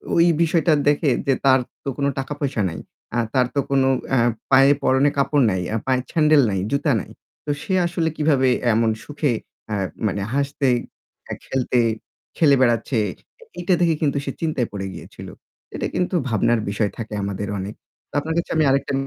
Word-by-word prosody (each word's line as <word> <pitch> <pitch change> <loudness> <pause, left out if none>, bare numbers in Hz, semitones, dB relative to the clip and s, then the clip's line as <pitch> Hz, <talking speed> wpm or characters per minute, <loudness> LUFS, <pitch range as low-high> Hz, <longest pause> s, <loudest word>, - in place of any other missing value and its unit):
ওই 170 0 +5 0.2
বিষয়টা 165 0 +3
দেখে 145 0 +3 0.2
যে 135 - +4
তার 130 -1 +6 0.2
তো 140 - -3
কোন 140 - 0
টাকা-পয়সা 140 -4 -3
নাই। 80 - -7 0.3
অ্যা 120 0 +1
তার 125 -2 +3
তো - - +2
কোনো 135 -1 +3 0.2
অ্যা 130 - +3 0.3
পায়ে 135 +1 +7
পরনে 130 +2 +3
কাপড় 140 0 +2
নাই, 95 -1 -1 0.3
পায়ে 130 -1 +2
স্যান্ডেল 155 -2 +5
নাই, 95 - -1
জুতা 145 +1 +1
নাই। - - -12 0.3
তো - - -6
সে 190 - -3
আসলে 170 -2 0
কিভাবে 140 -4 +3 0.2
এমন 115 0 +2
সুখে 145 -2 -1 0.4
অ্যা 105 -2 -2 0.3
মানে 100 0 -2
হাসতে, 140 0 0 0.8
খেলতে 125 -1 0 0.6
খেলে 145 -4 +5
বেড়াচ্ছে 120 0 +2 0.6
এইটা 180 +1 +1
দেখে 165 -2 +3
কিন্তু 140 -2 +1
সে 135 - -2
চিন্তায় 150 -7 0
পড়ে 95 -1 -4
গিয়েছিল। 85 - -10 0.5
এটা - - -2
কিন্তু 180 0 0
ভাবনার 115 +1 +2
বিষয় 100 0 0
থাকে 110 -2 -6
আমাদের 100 +1 -3
অনেক। 100 +3 -5 0.4
তো - - -45
আপনার 160 +2 -3
কাছে 170 - -2
আমি 155 - +3
আরেকটা 140 +1 +1
135 Hz, 170 wpm, -22 LUFS, 120-150 Hz, 0.8 s, পায়ে